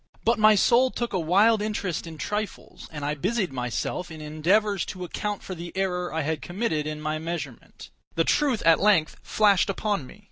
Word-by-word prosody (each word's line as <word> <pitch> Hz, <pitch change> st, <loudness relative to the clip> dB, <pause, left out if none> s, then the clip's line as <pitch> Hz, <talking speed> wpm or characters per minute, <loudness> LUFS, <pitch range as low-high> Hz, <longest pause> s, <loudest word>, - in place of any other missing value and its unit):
But 235 Hz, +1 st, +3 dB
my 215 Hz, 0 st, +6 dB
soul 245 Hz, +5 st, +4 dB
took 240 Hz, -3 st, -4 dB
a 185 Hz, -, +1 dB
wild 205 Hz, +7 st, +4 dB
interest 200 Hz, -6 st, -3 dB
in 160 Hz, -1 st, -9 dB
trifles, 210 Hz, +4 st, -5 dB
and 150 Hz, -2 st, -5 dB
I 145 Hz, -, 0 dB
busied 190 Hz, -, -1 dB
myself 125 Hz, +8 st, -3 dB
in 160 Hz, -1 st, -9 dB
endeavors 180 Hz, +7 st, +1 dB
to 185 Hz, -1 st, -6 dB
account 205 Hz, +3 st, -4 dB
for 190 Hz, -, -6 dB
the 170 Hz, -1 st, -7 dB
error 180 Hz, -2 st, -1 dB
I 160 Hz, -, -1 dB
had 155 Hz, +1 st, -2 dB
committed 175 Hz, -6 st, -2 dB
in 155 Hz, 0 st, -4 dB
my 155 Hz, 0 st, -2 dB
measurement. 170 Hz, +1 st, -7 dB, 0.2 s
The -, -, +3 dB
truth 275 Hz, -7 st, +1 dB
at 165 Hz, -1 st, +5 dB
length 195 Hz, -6 st, +3 dB
flashed 205 Hz, -3 st, +3 dB
upon 195 Hz, -7 st, -1 dB
me. -, -, -14 dB
180 Hz, 190 wpm, -25 LUFS, 155-210 Hz, 0.2 s, my